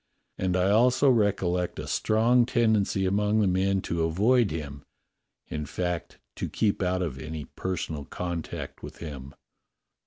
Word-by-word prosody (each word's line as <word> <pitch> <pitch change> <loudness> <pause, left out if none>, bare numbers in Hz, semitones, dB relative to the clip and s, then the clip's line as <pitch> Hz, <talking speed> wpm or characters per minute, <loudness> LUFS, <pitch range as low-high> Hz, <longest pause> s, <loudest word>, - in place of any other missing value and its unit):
And 95 -1 +1
I 95 +2 +3
also 125 +5 +5
recollect 95 -6 +1
a - - -5
strong 115 +3 +3
tendency 110 -6 +2
among 105 +3 +2
the 105 - +3
men 95 +1 +1
to 85 -2 -2
avoid 105 +8 +3
him 70 -3 -5 0.3
— - - -52
in 75 -1 -3
fact, 90 +1 -3 0.2
to - - -3
keep 105 -3 0
out 90 0 +1
of 70 -6 -4
any 75 0 -6
personal 80 -3 -4
contact 85 0 -5
with - - -9
him." 70 -4 -8
95 Hz, 150 wpm, -27 LUFS, 80-105 Hz, 0.3 s, also